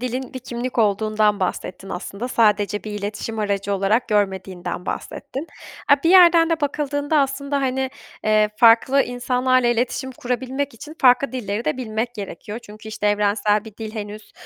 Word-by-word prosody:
dilin 255 +1 -4
bir - - -3
kimlik 245 0 -5
olduğundan 215 0 +2
bahsettin 185 +1 -3
aslında. 200 +6 -5
Sadece 210 -3 +2
bir 215 - -5
iletişim 210 +2 -4
aracı 200 -1 -1
olarak 210 +6 +1
görmediğinden 190 -4 -2
bahsettin. 275 +5 -5 0.4
A, 285 - +7
bir 330 - +3
yerden 340 -3 +7
de 330 -1 0
bakıldığında 290 +1 0
aslında, 280 0 0
hani, 265 0 -1 0.3
eee, 215 0 +3
farklı 235 +4 +5
insanlarla 250 +1 +1
iletişim 245 +2 -1
kurabilmek 260 +2 -3
için 300 +7 -10
farklı 255 +1 +4
dilleri 225 -3 -3
de - - 0
bilmek 235 -1 -3
gerekiyor. 205 +1 -7
Çünkü, 215 +1 -12
işte, 215 -1 -3
evrensel 205 0 +2
bir 220 -2 -12
dil 220 -1 -7
henüz, 210 0 -7
230 Hz, 155 wpm, -21 LUFS, 210-260 Hz, 0.4 s, A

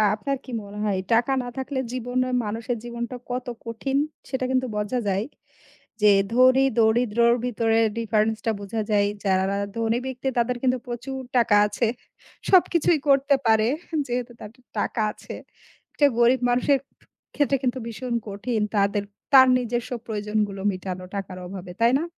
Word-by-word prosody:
আপনার 275 +6 -2
কি - - -10
মনে 205 +1 -10
হয়, 200 -2 0
টাকা 240 +4 +3
না 245 - -6
থাকলে 265 0 -3
জীবনে 255 +1 -1 0.2
মানুষের 225 +3 -3
জীবনটা 235 +1 -5
কত 250 0 -3 0.2
কঠিন 240 +4 -2 0.3
সেটা 260 -1 -1
কিন্তু 260 0 +1
বোঝা 210 +4 -1
যায়। 195 +2 0 0.8
যে, 210 - +7 0.2
ধনী 255 +2 +5
দরিদ্রের 235 +1 +3
ভিতরে 225 -1 +1 0.2
ডিফারেন্স 220 -1 +1
টা 225 - +3
বোঝা 205 +3 -4
যায়। 205 -1 +3 0.2
যারা 190 -1 +2 0.3
ধনী 230 +1 +1
ব্যক্তি 260 +1 -3
তাদের 240 +1 +1
কিন্তু 255 -1 +2
প্রচুর 250 +2 -5 0.2
টাকা 230 -3 +4
আছে। 210 +3 -1 0.6
সবকিছুই 345 -3 +4
করতে 275 +1 +4
পারে, 220 0 +4 0.4
যেহেতু 245 0 -3
তাদের 225 +4 -12 0.2
টাকা - - -1
আছে। - - -10 0.6
এটা 290 - +4
গরীব 240 +2 +4
মানুষের 250 +3 +3 0.6
ক্ষেত্রে 280 -1 +2
কিন্তু 255 +1 0
ভীষণ, 235 +2 -4
কঠিন 215 +3 -2 0.2
তাদের 200 0 +2 0.3
তার 260 -1 +9
নিজস্ব 245 +1 -3 0.2
প্রয়োজনগুলো 210 -2 -2
মিটানো 185 0 -6
টাকার 190 -2 -5
অভাবে। 180 -1 -8
তাই 235 +2 +5
না? - - -2
235 Hz, 150 wpm, -24 LUFS, 210-255 Hz, 0.8 s, তার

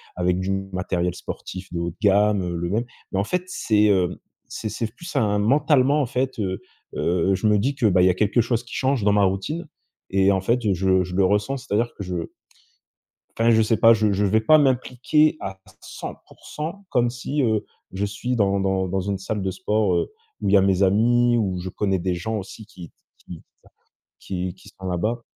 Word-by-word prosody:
avec 90 0 0
du 95 +1 -2 0.2
matériel 90 -1 -1
sportif 95 +1 -8
de 85 - -2
haut 85 0 -2
de 85 - -13
gamme, 105 0 +3
heu, 90 -1 -3
le 85 0 -3
même. 110 +6 0 0.3
Mais 95 - 0
en - - +2
fait 180 - -1
c'est, 110 -12 +1
hem, 90 -3 +2 0.3
c'est 110 - -5
c'est 115 - -3
plus 170 +4 -9
un 105 -1 +2
mentalement 140 +4 +3
en - - +1
fait, 130 0 -2
heu, 95 -2 -2 0.3
heu, 90 +2 +1
je 95 - -4
me 105 -1 +4
dis 135 +7 0
que, 125 -5 +2
bah 90 -3 +3
il - - +5
y - - +5
a - - +3
quelque 105 +6 +1
chose 115 0 -1
qui 120 - -12
change 135 -4 0
dans 105 - +4
ma 100 0 +3
routine 100 - -2 0.4
et 95 0 +3
en 95 - +2
fait, 120 +5 0
heu, 100 - +3
je 95 0 +2
je 90 0 -8
le 95 0 +3
ressens, 105 +8 +1
c'est-à-dire 115 -1 -1
que - - -5
je 90 0 -4 1.2
enfin 115 +1 +4
je 110 -1 +5
sais 110 +1 +2
pas, 115 +2 +6
je 110 -2 +1
je 100 +1 +1
vais 105 +3 +3
pas 155 +8 +5
m'impliquer 135 +3 +2
à 95 0 -6 0.2
100% 165 +6 -8
comme 120 -1 +2
si, 135 +4 -2
heu, 110 -4 +1 0.3
je 95 +2 -2
suis 120 +5 -3
dans 100 -2 +2
dans 95 -1 0
dans 95 +2 -1
une 100 +1 -2
salle 100 +2 -4
de 95 - -1
sport, 95 +1 0
heu, - - -1 0.3
où - - -1
il - - +2
y 100 - +7
a - - +6
mes 95 0 +2
amis, 120 +5 +3
où 95 -5 -1
je 90 - -5
connais 95 0 -1
des 90 +1 -1
gens 110 +6 -3
aussi 105 +2 -9
qui 90 -4 -12 0.3
qui 85 -3 -11 0.8
qui 90 -1 -4
qui 95 +2 -17
sont 95 -2 -10
là-bas. 110 +7 -1
100 Hz, 220 wpm, -23 LUFS, 95-120 Hz, 1.2 s, y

